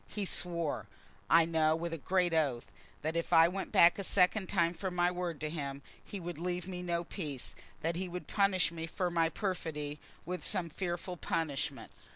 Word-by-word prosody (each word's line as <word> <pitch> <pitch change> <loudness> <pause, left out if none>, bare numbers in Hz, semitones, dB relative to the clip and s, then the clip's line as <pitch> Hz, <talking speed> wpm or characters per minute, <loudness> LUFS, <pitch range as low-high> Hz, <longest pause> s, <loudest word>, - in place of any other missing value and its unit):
He 205 -2 -3
swore, 170 - -1 0.4
I 165 0 +7
know, 160 -1 +3
with 165 +1 -3
a - - -2
great 180 +2 +1
oath, 140 -7 +1 0.4
that 160 +2 -1
if 170 0 -1
I 165 -1 +8
went 190 +2 -4
back 170 +3 +6
a - - -1
second 190 +1 +3
time 170 -3 +2
from 180 +1 -4
my 175 0 +3
word 175 -3 -3
to 155 - -1
him 140 -3 -4 0.2
he 200 - -6
would 175 -2 -6
leave 180 0 -2
me 180 -1 -4
no 170 -1 -1
peace, 150 -7 -5 0.3
that 165 +1 0
he 185 +1 -3
would 180 +1 -5
punish 195 -4 +3
me 165 -1 -5
for 180 +1 -1
my 165 -1 +3
perfidy 160 -6 -3 0.3
with 180 +2 -4
some 180 -5 +2
fearful 175 +1 -4
punishment. 155 -5 -2
170 Hz, 195 wpm, -33 LUFS, 160-180 Hz, 0.4 s, I